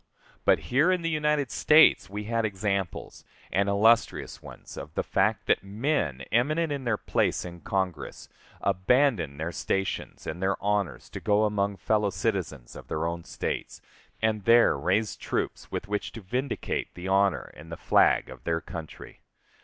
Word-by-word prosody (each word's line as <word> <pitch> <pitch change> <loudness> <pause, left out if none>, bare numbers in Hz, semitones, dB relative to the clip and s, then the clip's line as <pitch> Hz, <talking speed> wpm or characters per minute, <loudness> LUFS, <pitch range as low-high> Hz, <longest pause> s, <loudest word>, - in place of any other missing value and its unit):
But - - +5 0.2
here 150 +8 +5
in 180 -2 0
these 165 - 0
United 150 -3 +1
States 150 -11 +5
we 105 +2 -5
had 115 +1 -1
examples, 100 -3 -3 0.3
and 100 +1 +1
illustrious 110 +3 +2
ones, - - -11
of 75 +2 -9
the - - 0
fact - - +1
that - - +2
men, 100 - -1
eminent 155 +7 +2
in 140 -2 -3
their 115 -3 +1
place - - 0
in 85 -1 -8
Congress, 95 -5 -3 0.3
abandoned 95 - +2
their 80 +2 -2
stations 95 +2 -3
and 85 +3 -5
their 95 +1 +1
honors 100 -4 -1
to - - -6
go 105 0 +2
among 100 -1 0
fellow 105 -1 +1
citizens 95 - -3
of - - -10
their 80 +1 -2
own 85 0 -3
States, - - -4 0.4
and 110 -3 +1
there 115 -5 +6
raise 95 +9 0
troops - - -3
with - - -4
which 105 0 -2
to 115 - -8
vindicate 125 +8 -3
the 90 +1 -6
honor 95 -1 +2
and 80 +2 -12
the 85 - -5
flag - - +3
of 65 -1 -12
their 80 +2 0
country. 80 -2 -9
100 Hz, 165 wpm, -27 LUFS, 90-115 Hz, 0.4 s, there